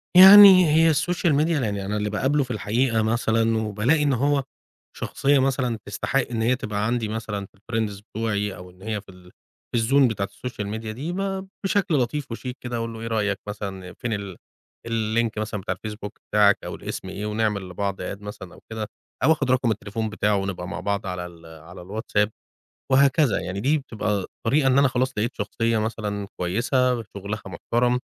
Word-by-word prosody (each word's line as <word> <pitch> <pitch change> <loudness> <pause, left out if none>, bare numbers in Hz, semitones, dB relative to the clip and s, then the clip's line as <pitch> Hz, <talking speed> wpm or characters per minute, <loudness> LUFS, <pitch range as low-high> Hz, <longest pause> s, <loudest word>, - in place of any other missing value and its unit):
يعني 190 0 +11
هي 160 +1 +5
الSocial 170 +2 +1
Media 160 - +1
يعني 100 -3 -2
أنا 105 +2 -2
اللي 105 0 -1
باقابله 135 +7 +1
في 130 - -7
الحقيقة 115 +2 +1
مثلًا، 115 0 +1
وبالاقي 110 +8 +1
إن 145 -2 +2
هو 140 +3 +1 0.5
شخصية 140 0 +1
مثلًا 130 -3 0
تستحق 120 +6 -1
إن 115 -2 -1
هي 120 +3 +3
تبقى 105 -4 -3
عندي 115 0 0
مثلًا 105 -2 -4
في 100 - -23
الfriends 105 -1 -3
بتوعي 105 -2 -2
أو 90 +1 -11
إن 90 +1 -20
هي 105 0 -3
في - - -21
ال 90 -1 -15 0.4
في 115 - +3
الzone 135 +3 +4
بتاعة 100 -3 -2
الSocial 115 -5 -5
Media 110 0 -6
دي، 130 +10 -4
ب 195 0 -3 0.2
بشكل 195 -4 +1
لطيف 130 +1 -1
وشيك 125 +2 -5
كده 120 -1 -4
أقول 115 0 -3
له 115 - -8
إيه 115 - -4
رأيك 105 -3 0
مثلًا 95 -3 -6
فين 120 +2 -4
ال 100 -3 -5 0.5
الlink 115 0 0
مثلًا 105 -1 -3
بتاع 95 - -2
ال 110 - -3
Facebook 105 -1 -7 0.2
بتاعك 105 -1 +5
أو - - -5
الاسم - - -6
إيه، 105 - -5
ونعمل 105 -3 -1
لبعض 100 +1 -3
add 100 +2 -5
مثلًا 105 -3 -9
أو - - -15
كده، 110 -1 -4 0.4
أو 150 - +5
آخد 145 -5 +1
رقم 130 -2 +2
التليفون 110 +1 -3
بتاعه 105 -1 +1
ونبقى 95 -2 -3
مع - - -5
بعض 100 +1 -2
على 90 -1 -4
ال 85 -1 -13
على 80 +2 -12
الWhatsApp، 105 +1 0 0.6
وهكذا. 135 -3 +4
يعني 95 +1 -4
دي 145 +7 +2
بتبقى 105 -7 -2 0.2
طريقة 140 +4 +3
إن 135 0 +4
أنا 140 -1 +5
خلاص 130 +1 0
لقيت 115 +4 -1
شخصية 115 +2 0
مثلًا 105 -2 -3
كويسة، 120 +6 +1
شغلها 100 0 -6
محترم. 120 +7 0
110 Hz, 190 wpm, -24 LUFS, 100-130 Hz, 0.6 s, يعني